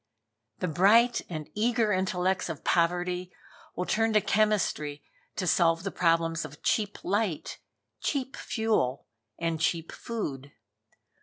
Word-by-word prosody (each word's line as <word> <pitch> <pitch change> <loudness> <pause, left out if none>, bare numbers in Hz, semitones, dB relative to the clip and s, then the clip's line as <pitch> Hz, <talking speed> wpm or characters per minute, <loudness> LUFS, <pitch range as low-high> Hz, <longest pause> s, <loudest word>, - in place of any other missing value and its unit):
The 180 - -2
bright 210 +9 +4
and 155 -3 -5
eager 225 0 +1
intellects 185 -1 0
of 160 -4 -6
poverty 180 +1 +1 0.4
will 180 - -2
turn 225 +2 +1
to 215 - +5
Chemistry 195 -9 +1 0.3
to 185 - -2
solve 165 0 +3
the 195 - -3
problems 165 -1 +1
of 150 -1 -10
cheap 210 -2 0
Light, 200 -3 -1 0.4
cheap 270 -2 -2
Fuel 215 - 0 0.3
and 165 -1 -1
cheap 165 -1 0
Food. 140 - -5
180 Hz, 125 wpm, -28 LUFS, 165-215 Hz, 0.4 s, to